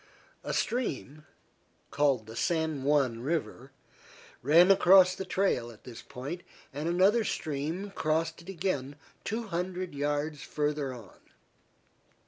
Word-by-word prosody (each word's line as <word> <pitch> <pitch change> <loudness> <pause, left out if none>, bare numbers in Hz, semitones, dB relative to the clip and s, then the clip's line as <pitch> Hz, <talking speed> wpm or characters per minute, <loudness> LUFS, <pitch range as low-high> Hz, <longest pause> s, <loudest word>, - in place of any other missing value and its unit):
A - - -3
stream, 155 - -2 0.6
called 140 -6 +2
the 110 +1 -10
San 160 +2 0
Juan 135 -5 +2
River, 135 -1 -3 0.7
ran 165 +8 +6
across 185 -1 +7
the 190 +1 -5
trail 185 -11 0
at 115 -2 -15
this 120 -3 -10
point, 145 +8 -7 0.3
and 150 +4 -2
another 195 +6 +4
stream 160 +4 -3
crossed 160 -1 -1
it 170 - -13
again 145 -7 -2 0.3
two 225 +3 -2
hundred 180 0 -3
yards 145 +1 -2
farther 150 -2 -2
on. 115 -6 -12
155 Hz, 120 wpm, -29 LUFS, 140-180 Hz, 0.7 s, across